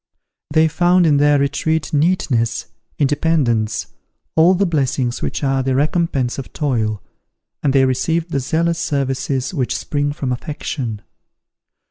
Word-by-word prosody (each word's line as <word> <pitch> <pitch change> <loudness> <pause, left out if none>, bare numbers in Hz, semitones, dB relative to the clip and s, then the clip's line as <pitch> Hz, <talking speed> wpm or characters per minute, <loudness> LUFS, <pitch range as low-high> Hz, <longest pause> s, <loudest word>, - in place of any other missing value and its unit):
They 155 +1 +4
found 175 +3 +3
in 150 -3 +4
their 145 0 +4
retreat 145 +2 -1
neatness, 145 -7 +1 0.3
independence, 135 -7 +1 0.5
all 170 +4 +5
the 200 +2 +2
blessings 135 -6 -1
which - - -3
are 135 -1 +1
the 130 0 0
recompense 145 -3 0
of 135 - -8
toil, 110 - -1 0.6
and 140 - +2
they 135 -1 +4
received 160 +6 0
the 140 - 0
zealous 165 +5 0
services 135 -1 -1
which 130 -7 -1
spring 145 -1 -1
from 140 -3 -3
affection. 125 -4 -4
140 Hz, 130 wpm, -19 LUFS, 130-160 Hz, 0.6 s, all